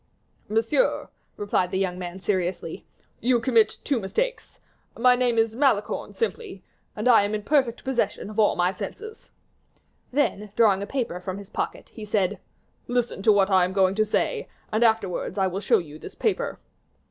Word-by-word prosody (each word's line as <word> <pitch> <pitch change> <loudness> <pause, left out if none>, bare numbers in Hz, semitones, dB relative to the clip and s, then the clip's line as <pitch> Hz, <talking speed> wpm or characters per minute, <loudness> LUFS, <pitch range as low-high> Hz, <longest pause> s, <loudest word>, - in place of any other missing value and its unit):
"Monsieur," 225 - +1 0.3
replied 200 -3 0
the 190 - -2
young 185 -2 -1
man, 180 +1 -6
seriously, 185 -2 -2 0.3
"you 245 0 +2
commit 230 -2 +3
two 275 -5 0
mistakes. - - -3 0.4
My 250 +1 +5
name 245 -2 +1
is 225 0 +2
Malicorne, 250 -6 0
simply; 460 -3 -3 0.3
and - - -2
I 235 -4 +7
am 205 +1 -1
in 210 - -4
perfect 260 -3 +1
possession 240 -7 -1
of 215 - -5
all 210 - +4
my 180 +1 +2
senses." 430 - -8 0.8
Then, 230 -7 0
drawing 205 -4 +4
a 200 - -4
paper 240 -9 -3
from 185 +1 -5
his 200 0 -11
pocket, - - -4
he 220 - -10
said, 205 -2 0 0.5
"Listen 245 -4 -1
to 215 - +5
what 200 -1 +3
I 185 -1 +5
am 180 +1 -1
going 190 -1 +3
to 215 +2 +2
say; 215 - -1 0.2
and 220 +2 +2
afterwards, 220 -5 +1
I 195 - +2
will 190 +1 -2
show - - +3
you 155 -2 -7
this - - -10
paper." - - -1
215 Hz, 175 wpm, -25 LUFS, 190-245 Hz, 0.8 s, I